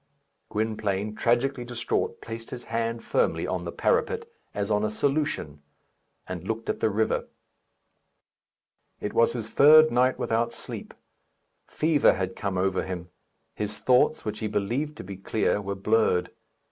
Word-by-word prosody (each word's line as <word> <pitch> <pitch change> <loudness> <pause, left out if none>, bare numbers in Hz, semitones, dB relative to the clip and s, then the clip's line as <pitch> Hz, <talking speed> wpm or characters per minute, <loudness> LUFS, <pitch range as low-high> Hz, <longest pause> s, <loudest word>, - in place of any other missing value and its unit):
Gwynplaine, 105 -1 -1
tragically 120 +3 +1
distraught, 120 -1 -2
placed 115 0 -7
his 120 -1 -7
hand 115 0 -2
firmly - - +1
on - - -3
the - - -4
parapet, 465 -1 +1 0.3
as 100 +1 -2
on 105 0 +2
a 105 - +1
solution, 120 - -1 0.6
and 90 -2 -6
looked 115 0 -3
at - - -1
the - - +2
river. 110 +2 0 1.7
It 105 - -4
was 115 - +4
his 110 -2 -5
third 155 +2 +7
night 125 +2 +3
without 115 +1 0
sleep. - - -8 0.7
Fever 155 -2 +3
had 95 -1 -3
come 100 -2 -2
over 95 0 +1
him. 90 -2 -6 0.4
His 105 0 -4
thoughts, 130 +7 +3
which 105 0 -3
he 110 - -2
believed 120 +9 -2
to - - -7
be 95 0 -8
clear, 105 +1 0
were 100 0 -3
blurred. 105 -2 +2
110 Hz, 145 wpm, -26 LUFS, 100-125 Hz, 1.7 s, third